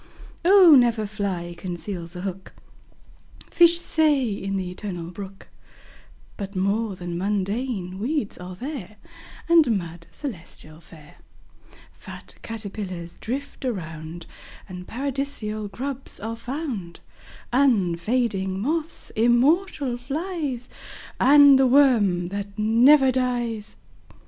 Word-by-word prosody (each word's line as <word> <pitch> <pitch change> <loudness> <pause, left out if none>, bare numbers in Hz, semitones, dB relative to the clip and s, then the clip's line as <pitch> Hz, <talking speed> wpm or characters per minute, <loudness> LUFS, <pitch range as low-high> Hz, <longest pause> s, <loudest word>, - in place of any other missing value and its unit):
Oh! 365 -2 +8
never 235 -4 +3
fly 195 -5 -3
conceals 175 0 -6
a 180 - -6
hook, 190 0 -6 1.0
Fish 340 0 +6
say, 300 -7 +2
in 195 0 -3
the 185 -1 -3
Eternal 180 -3 -6
Brook, 195 +1 -10 0.9
But 200 -1 -6
more 200 +2 0
than 175 -1 -5
mundane 200 0 -2
weeds 250 -1 -2
are 180 +1 -8
there, 240 - -7 0.5
And 320 -10 +5
mud, 170 -2 -8
celestially 165 - -9
fair; 155 -3 -16 0.7
Fat - - -11
caterpillars 195 -6 -6
drift 275 +6 -5
around, 165 -7 -5 0.4
And 180 -1 -9
Paradisal 255 -5 -3
grubs 265 +6 -6
are 225 +2 -4
found; 230 - -5 0.5
Unfading 200 -4 +1
moths, 315 +8 -3
immortal 255 - +2
flies, 280 -1 -4 0.5
And 285 -1 +7
the 265 - +5
worm 225 -10 +4
that 200 +1 -6
never 255 +6 +5
dies. 240 -4 -2
215 Hz, 105 wpm, -24 LUFS, 185-265 Hz, 1.0 s, Oh